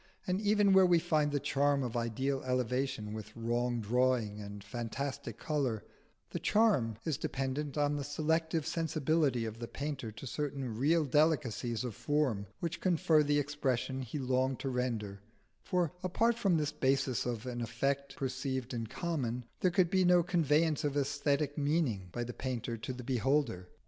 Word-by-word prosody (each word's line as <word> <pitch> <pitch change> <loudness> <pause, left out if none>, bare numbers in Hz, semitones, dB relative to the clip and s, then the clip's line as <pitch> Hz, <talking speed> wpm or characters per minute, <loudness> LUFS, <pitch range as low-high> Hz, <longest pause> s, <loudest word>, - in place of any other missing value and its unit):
And 185 +2 0
even 205 -1 +4
where 190 -1 +7
we 175 -1 +5
find 155 -3 +1
the 145 - +1
charm 140 0 +2
of 120 -2 -4
ideal 130 +4 -1
elevation 125 -3 -1
with 110 0 -8
wrong 120 +1 0
drawing 115 -2 +1
and 100 0 -8
fantastic 120 +6 -4
colour, 135 -9 -1 0.5
the - - -3
charm 195 - +3
is 155 -4 -1
dependent 135 +2 -2
on 145 0 +2
the 145 - -3
selective 160 +2 0
sensibility 155 -6 +1
of 110 0 -6
the 115 - -5
painter 140 -5 -4
to 110 +5 -9
certain 135 -3 -3
real 155 +7 +3
delicacies 125 -6 +1
of 125 -3 -3
form 130 -7 0
which 170 +1 -3
confer 165 -3 +4
the 145 0 +2
expression 135 -2 -1
he 130 +3 -5
longed 130 -1 +1
to 135 - -2
render; 115 -6 -2 0.4
for 180 -3 0
apart 225 +6 +2
from 195 -7 +2
this 150 -2 0
basis 130 -2 +1
of 120 -2 -3
an 120 -1 -4
effect 135 +4 -1
perceived 130 -1 -3
in 115 -2 -3
common, 125 -5 -2
there 185 - +3
could 180 -1 +2
be 190 -1 +4
no 180 -1 +5
conveyance 160 -3 +2
of 145 -1 0
aesthetic 145 +1 0
meaning 140 - 0
by 120 - -3
the 120 +1 -5
painter 120 -2 -3
to 115 +3 -5
the 125 0 -7
beholder. 125 -6 0
135 Hz, 165 wpm, -33 LUFS, 120-155 Hz, 0.5 s, where